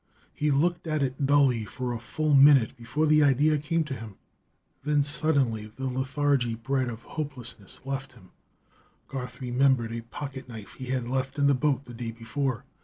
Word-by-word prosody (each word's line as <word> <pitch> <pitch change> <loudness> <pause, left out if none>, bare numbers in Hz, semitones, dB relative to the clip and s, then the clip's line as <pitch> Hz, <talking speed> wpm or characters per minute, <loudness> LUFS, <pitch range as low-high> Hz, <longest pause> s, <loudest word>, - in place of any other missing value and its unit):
He 150 - 0
looked 170 +5 +1
at 155 -2 0
it 135 +1 -1
dully 135 -5 +4
for 125 +5 -4
a 115 - -4
full 150 +7 -1
minute 135 -4 +6
before 125 +6 -1
the 155 0 +5
idea 145 +2 +4
came 165 +3 0
to 150 -3 -5
him. 110 -5 -8 0.7
Then 150 0 +2
suddenly 140 -7 +2
the 125 +5 -7
lethargy 130 -1 0
bred 130 +2 -1
of 115 0 -8
hopelessness 125 - -6
left 135 -1 -4
him. 95 -7 -18 0.8
Garth 125 -2 -6
remembered 125 -2 +2
a 115 - -4
pocket 130 +2 -8
knife 110 -4 -9
he 130 - -8
had 130 -1 -1
left 130 +3 -2
in 140 - +2
the 140 - +5
boat 140 0 0
the 120 - -10
day 115 0 -5
before. 120 +3 -3
130 Hz, 180 wpm, -27 LUFS, 120-145 Hz, 0.8 s, minute